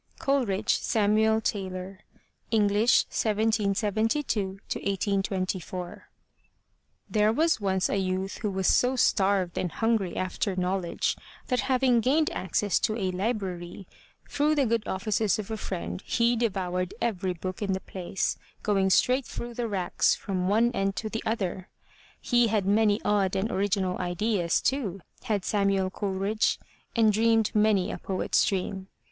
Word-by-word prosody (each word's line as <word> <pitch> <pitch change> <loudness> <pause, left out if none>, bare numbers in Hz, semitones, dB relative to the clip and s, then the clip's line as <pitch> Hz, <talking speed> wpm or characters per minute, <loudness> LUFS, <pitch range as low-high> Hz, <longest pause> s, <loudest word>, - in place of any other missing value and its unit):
COLERIDGE, 250 -9 +1
SAMUEL 220 +1 +2
TAYLOR 190 -2 -4 0.5
(English, 210 +1 +4
1772 215 0 0 0.2
1824) 190 -3 -3 1.0
There 215 0 +2
was 315 +1 +2
once 190 -2 +1
a - - -1
youth 190 +1 -2
who 210 - -1
was 190 -1 -2
so 250 +7 +3
starved 195 -6 +2
and 180 - -2
hungry 225 -5 0
after 185 +1 -2
knowledge, 180 -1 -1 0.3
that 250 -1 +1
having 255 -2 +3
gained 290 +7 +2
access 190 +2 0
to 215 - 0
a 190 -4 -1
library 185 -3 -3 0.4
through 300 +2 +1
the 280 -2 +2
good 230 -1 0
offices 205 +2 0
of 215 0 -6
a - - -1
friend, 85 - -5
he 235 +1 +2
devoured 185 -5 -1
every 190 -5 -1
book 185 +3 -6
in 200 -2 0
the 190 - -1
place, 185 0 -3 0.2
going 195 -2 +2
straight 255 +7 +3
through 240 0 -6
the 235 0 -2
racks 190 -4 +1
from 185 -3 -3
one 225 +4 +3
end 195 -3 -1
to 220 - -3
the 225 - -3
other! 190 -4 -2 0.5
He 240 -1 +3
had 210 -3 0
many 205 +1 +3
odd 200 -2 +2
and 205 +4 -1
original 195 -2 0
ideas, 180 0 0
too, 215 -9 -1 0.2
had 210 -5 -1
Samuel 195 -2 +1
Coleridge, 200 +2 0 0.4
and 220 -2 +4
dreamed 225 0 +2
many 210 -3 +2
a - - -6
poet's 190 -1 +1
dream. 190 0 -2
200 Hz, 140 wpm, -27 LUFS, 190-225 Hz, 1.0 s, English